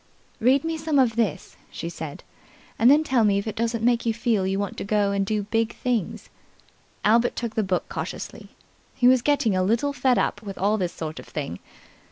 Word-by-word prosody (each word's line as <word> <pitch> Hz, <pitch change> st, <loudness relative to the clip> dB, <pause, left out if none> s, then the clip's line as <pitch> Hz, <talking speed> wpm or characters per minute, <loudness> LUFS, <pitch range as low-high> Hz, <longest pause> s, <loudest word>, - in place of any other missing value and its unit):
"Read 260 Hz, +4 st, +3 dB
me 325 Hz, 0 st, -2 dB
some 310 Hz, -2 st, 0 dB
of 245 Hz, -4 st, +3 dB
this," 220 Hz, -9 st, -2 dB
she -, -, -6 dB
said, 160 Hz, -3 st, -7 dB, 0.6 s
"and 235 Hz, -, +6 dB
then 295 Hz, +3 st, +6 dB
tell 260 Hz, -6 st, +2 dB
me 200 Hz, -2 st, +3 dB
if 200 Hz, -, -2 dB
it 220 Hz, -, -4 dB
doesn't 230 Hz, 0 st, -1 dB
make 240 Hz, -1 st, +3 dB
you 225 Hz, -2 st, 0 dB
feel 225 Hz, -5 st, +1 dB
you 195 Hz, 0 st, 0 dB
want 200 Hz, -1 st, -3 dB
to 200 Hz, -1 st, 0 dB
do 210 Hz, +1 st, -1 dB
big 225 Hz, +2 st, -1 dB
things." 225 Hz, -3 st, -2 dB, 0.7 s
Albert 230 Hz, +3 st, +3 dB
took 235 Hz, -2 st, -3 dB
the 220 Hz, -, +1 dB
book 185 Hz, -3 st, -1 dB
cautiously. -, -, -6 dB, 0.5 s
He 245 Hz, -, +3 dB
was 255 Hz, -1 st, +5 dB
getting 285 Hz, -7 st, +2 dB
a 185 Hz, -, +2 dB
little 230 Hz, +9 st, +1 dB
fed 260 Hz, -3 st, +2 dB
up -, -, 0 dB
with 200 Hz, -3 st, -8 dB
all 210 Hz, +3 st, +1 dB
this 180 Hz, -2 st, -1 dB
sort 160 Hz, -1 st, -6 dB
of -, -, -11 dB
thing. 140 Hz, -, -5 dB
225 Hz, 205 wpm, -24 LUFS, 200-245 Hz, 0.7 s, and